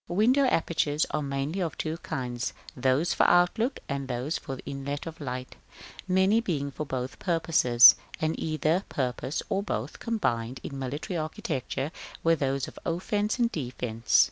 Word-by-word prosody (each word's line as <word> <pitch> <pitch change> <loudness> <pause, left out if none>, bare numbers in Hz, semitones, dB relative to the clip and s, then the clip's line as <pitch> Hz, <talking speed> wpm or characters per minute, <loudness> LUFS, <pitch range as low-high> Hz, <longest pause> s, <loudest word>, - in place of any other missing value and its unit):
Window 240 +10 +3
apertures 160 - +1
are 155 - 0
mainly 140 +5 -2
of 170 -4 -2
two 160 +1 -2
kinds; 125 -6 -3 0.2
those 130 +6 +2
for - - +4
outlook, 220 +9 +3
and 140 -1 -3
those 130 +5 -2
for 135 - -5
inlet 140 +1 -4
of 165 -1 -8
light, 130 -2 -5 0.5
many 190 +4 +4
being 145 -10 -2
for 150 +2 -5
both 130 -2 -4
purposes, 155 -9 +6 0.3
and 160 0 +1
either 160 +3 +1
purpose, 130 +1 -2
or 195 -2 0
both, 135 - -4
combined 125 - -1
in 135 - -6
military 145 +8 -3
architecture 155 - -3 0.3
with 165 -1 +3
those 135 -1 0
of - - -11
offence 205 +6 -1
and 240 -1 +2
defence. 120 -5 0
150 Hz, 150 wpm, -28 LUFS, 130-175 Hz, 0.5 s, purposes